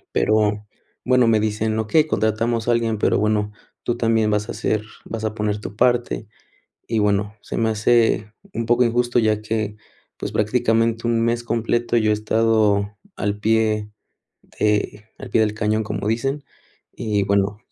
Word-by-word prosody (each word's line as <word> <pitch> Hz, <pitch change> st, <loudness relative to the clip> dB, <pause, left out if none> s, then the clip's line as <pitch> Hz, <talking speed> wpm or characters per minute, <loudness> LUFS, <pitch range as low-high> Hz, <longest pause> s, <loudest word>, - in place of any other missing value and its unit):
Pero 105 Hz, -1 st, +2 dB, 0.4 s
bueno, 125 Hz, -1 st, +4 dB
me 110 Hz, -1 st, +3 dB
dicen: 110 Hz, +1 st, -1 dB
"Okey, 150 Hz, +8 st, +3 dB
contratamos 115 Hz, 0 st, 0 dB
a -, -, +4 dB
alguien, 115 Hz, -2 st, 0 dB
pero -, -, +2 dB
bueno, 105 Hz, 0 st, 0 dB, 0.3 s
tú 120 Hz, -, -1 dB
también 115 Hz, -2 st, +2 dB
vas 105 Hz, +1 st, 0 dB
a -, -, -4 dB
ser 110 Hz, -1 st, -1 dB, 0.2 s
vas 110 Hz, -1 st, -5 dB
a 110 Hz, -, -2 dB
poner 105 Hz, -1 st, -1 dB
tu 100 Hz, 0 st, -7 dB
parte". 120 Hz, -, +1 dB, 0.6 s
Y 115 Hz, -, 0 dB
bueno, 105 Hz, 0 st, +1 dB
se -, -, -6 dB
me 115 Hz, -1 st, +1 dB
hace 110 Hz, -1 st, +2 dB, 0.2 s
un 115 Hz, -, -2 dB
poco 120 Hz, +2 st, +3 dB
injusto 120 Hz, +1 st, +1 dB
ya 110 Hz, -2 st, +2 dB
que, 110 Hz, -1 st, -2 dB, 0.4 s
pues, -, -, -5 dB
prácticamente 115 Hz, +1 st, +1 dB
1 115 Hz, -1 st, +2 dB
mes 120 Hz, 0 st, 0 dB
completo 120 Hz, +1 st, 0 dB
yo 110 Hz, -2 st, +3 dB
he -, -, +4 dB
estado 105 Hz, -1 st, +1 dB, 0.2 s
al 105 Hz, 0 st, -2 dB
pie 110 Hz, -1 st, +1 dB, 0.7 s
de 105 Hz, 0 st, 0 dB
al -, -, -8 dB
pie 115 Hz, -, +3 dB
del 105 Hz, -1 st, +1 dB
cañón, 110 Hz, 0 st, 0 dB
como 105 Hz, -1 st, -4 dB
dicen. 135 Hz, +6 st, -1 dB, 0.5 s
Y 105 Hz, -3 st, -1 dB
bueno, 100 Hz, +1 st, +1 dB
110 Hz, 165 wpm, -21 LUFS, 105-115 Hz, 0.7 s, bueno